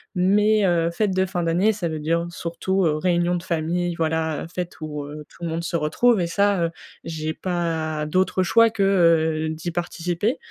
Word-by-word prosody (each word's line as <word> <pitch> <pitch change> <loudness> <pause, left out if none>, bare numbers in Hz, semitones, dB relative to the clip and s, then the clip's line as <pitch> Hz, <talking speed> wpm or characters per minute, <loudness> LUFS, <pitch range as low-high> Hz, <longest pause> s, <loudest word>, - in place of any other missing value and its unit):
Mais, 205 +3 +3
heu, 170 -2 +2
fêtes 195 +1 0
de 190 0 +2
fin 180 -2 -3
d'année 180 +6 +2
ça 180 -5 -3
veut 155 - -4
dire 165 +3 0
surtout, 175 +3 -1
heu, 150 - +2
réunion 175 +1 +1
de 170 - -4
famille, 170 0 -1
voilà, 160 -1 -1
heu, - - -7
fête 180 -1 -5
où, 150 -2 -5
heu, 150 +1 -9
tout - - -14
le 170 - -2
monde 165 +1 -3
se 170 - -3
retrouve 185 +8 +2
et 170 - 0
ça, 200 +1 +2
heu, 165 - -3 0.3
j'ai 155 -1 -4
pas 160 -4 -2
d'autre 185 +3 +1
choix 230 +5 +5
que, 215 -3 -1
heu, 165 -4 +3
d'y 160 +2 -4
participer. 175 - -2
170 Hz, 200 wpm, -23 LUFS, 160-185 Hz, 0.3 s, choix